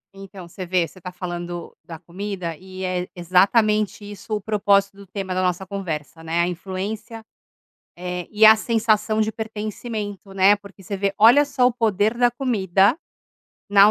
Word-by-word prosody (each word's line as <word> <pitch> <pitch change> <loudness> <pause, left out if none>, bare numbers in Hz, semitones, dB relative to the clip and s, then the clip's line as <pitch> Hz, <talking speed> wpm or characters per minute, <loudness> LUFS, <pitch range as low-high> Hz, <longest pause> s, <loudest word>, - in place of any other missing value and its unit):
Então 195 -2 -11
você 185 +2 -8
vê, 175 -1 +1
você 185 - -17
tá 180 +1 -7
falando 175 -1 -6
da 165 -1 -9
comida 180 -1 -5
e 185 0 -9
é 180 -1 -2
exatamente 205 +4 +2
isso 205 +2 -5
o 210 - -3
propósito 200 -1 +2
do 200 -1 -13
tema 190 -1 -4
da 185 - 0
nossa 180 +1 -1
conversa, 165 -5 -5
né, 165 +1 -1
a 175 - +1
influência, 200 +5 -5 0.7
eh, 180 0 -4
e 215 +1 +5
a 220 - +10
sensação 220 -1 +1
de 215 - +2
pertencimento, 215 -2 -6
né, 195 +2 +5
porque 200 -1 -15
você 200 +2 -4
vê, 195 0 -1
olha 235 +7 +7
só 280 -3 +2
o 250 - 0
poder 220 -1 +1
da 245 0 +4
comida 210 - +2 0.7
na 200 +1 +7
200 Hz, 170 wpm, -22 LUFS, 180-215 Hz, 0.7 s, a